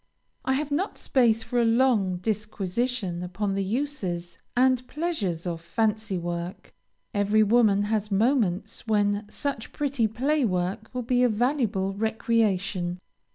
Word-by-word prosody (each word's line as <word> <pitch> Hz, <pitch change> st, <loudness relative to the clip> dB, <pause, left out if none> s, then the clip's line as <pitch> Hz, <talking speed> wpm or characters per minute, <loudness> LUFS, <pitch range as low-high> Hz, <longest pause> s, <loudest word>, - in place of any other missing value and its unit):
I 265 Hz, -, +1 dB
have 290 Hz, +2 st, -1 dB
not 360 Hz, +8 st, -1 dB
space 230 Hz, -4 st, +2 dB
for 245 Hz, +1 st, 0 dB
a -, -, +3 dB
long 225 Hz, -6 st, +3 dB
disquisition 210 Hz, 0 st, -2 dB
upon 195 Hz, +3 st, -2 dB
the 195 Hz, 0 st, 0 dB
uses 190 Hz, -, -3 dB, 0.2 s
and 255 Hz, 0 st, +3 dB
pleasures 225 Hz, -, -2 dB
of 170 Hz, -2 st, -3 dB
fancy 215 Hz, +2 st, -1 dB
work; 175 Hz, +1 st, -5 dB, 0.4 s
every 205 Hz, +1 st, +3 dB
woman 210 Hz, -2 st, +4 dB
has 210 Hz, 0 st, -1 dB
moments 215 Hz, -1 st, +1 dB
when 205 Hz, -1 st, +1 dB
such 280 Hz, -6 st, -4 dB
pretty 275 Hz, -6 st, 0 dB
playwork 220 Hz, -6 st, 0 dB
will 250 Hz, -1 st, -3 dB
be 245 Hz, +1 st, +2 dB
a 250 Hz, -, +5 dB
valuable 220 Hz, -5 st, 0 dB
recreation. 195 Hz, -4 st, 0 dB
215 Hz, 130 wpm, -26 LUFS, 190-245 Hz, 0.4 s, a